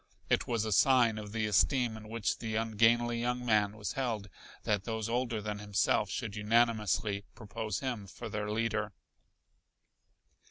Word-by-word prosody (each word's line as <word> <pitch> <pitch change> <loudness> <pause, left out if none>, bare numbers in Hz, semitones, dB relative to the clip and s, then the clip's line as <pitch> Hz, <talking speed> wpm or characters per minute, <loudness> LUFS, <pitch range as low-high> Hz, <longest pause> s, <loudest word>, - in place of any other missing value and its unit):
It - - +2
was 115 -2 0
a 110 - -2
sign 120 0 +4
of 105 -1 -8
the 110 0 -1
esteem 120 +3 +2
in 110 0 -10
which 115 -2 -1
the 110 -2 -3
ungainly 115 +2 +2
young 125 +1 -1
man 105 -2 +2
was 105 -4 -4
held 115 -6 -2 0.3
that 105 -2 0
those 110 -1 -3
older 120 -2 -1
than 105 -1 -4
himself 105 -1 +1
should 100 - -4
unanimously 105 -2 +1
propose 110 -1 -4
him 120 -7 -3
for 95 - -8
their 105 0 -3
leader. 105 -1 -1
110 Hz, 155 wpm, -32 LUFS, 105-115 Hz, 0.3 s, sign